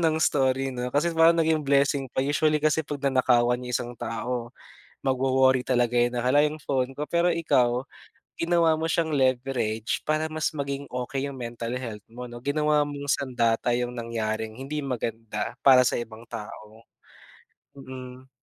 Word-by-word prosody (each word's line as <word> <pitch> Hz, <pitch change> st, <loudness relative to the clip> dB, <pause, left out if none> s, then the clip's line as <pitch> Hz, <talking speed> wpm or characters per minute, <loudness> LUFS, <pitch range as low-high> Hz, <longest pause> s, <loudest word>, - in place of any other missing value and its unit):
ng 160 Hz, -2 st, +2 dB
story 135 Hz, -2 st, +2 dB
'no, 125 Hz, 0 st, -3 dB
kasi 155 Hz, +4 st, +1 dB
parang 165 Hz, +1 st, +5 dB
naging 160 Hz, -1 st, +2 dB
blessing 140 Hz, 0 st, +2 dB
pa. -, -, 0 dB
Usually 150 Hz, +2 st, +2 dB
kasi 155 Hz, 0 st, +3 dB
'pag 145 Hz, -1 st, -5 dB
nanakawan 125 Hz, -2 st, +3 dB
yung 125 Hz, -, -6 dB
isang 120 Hz, +1 st, -2 dB
tao, 120 Hz, +1 st, -3 dB, 0.6 s
magwo-worry 130 Hz, 0 st, +3 dB
talaga 125 Hz, -1 st, +1 dB
yun. 120 Hz, 0 st, +3 dB
Na, 120 Hz, -, 0 dB
"Hala, 145 Hz, +4 st, +4 dB
yung 150 Hz, +1 st, -2 dB
phone 130 Hz, -1 st, -1 dB
ko." 150 Hz, -, -2 dB
Pero 170 Hz, +2 st, +2 dB
ikaw, 125 Hz, -6 st, +2 dB, 0.5 s
ginawa 165 Hz, -1 st, +3 dB
mo 160 Hz, +1 st, -2 dB
siyang 160 Hz, -1 st, 0 dB
leverage 125 Hz, -4 st, 0 dB
para 155 Hz, +1 st, +1 dB
mas 155 Hz, -1 st, 0 dB
maging 140 Hz, -1 st, -4 dB
okey 125 Hz, +2 st, -3 dB
yung 135 Hz, -, -9 dB
mental 120 Hz, 0 st, -5 dB
health 110 Hz, -5 st, -7 dB
mo 125 Hz, +2 st, -8 dB
'no. 120 Hz, 0 st, -9 dB
Ginawa 150 Hz, +1 st, +2 dB
mong 145 Hz, 0 st, -6 dB
sandata 120 Hz, -4 st, +1 dB
'yong 125 Hz, 0 st, -2 dB
nangyaring 110 Hz, -2 st, -3 dB
hindi 140 Hz, +3 st, -4 dB
maganda 115 Hz, -4 st, -4 dB
para 130 Hz, -2 st, +7 dB
sa -, -, +1 dB
ibang 115 Hz, 0 st, -9 dB
tao, 110 Hz, 0 st, -9 dB, 0.9 s
mm. 130 Hz, -1 st, -10 dB
130 Hz, 165 wpm, -26 LUFS, 120-145 Hz, 0.9 s, para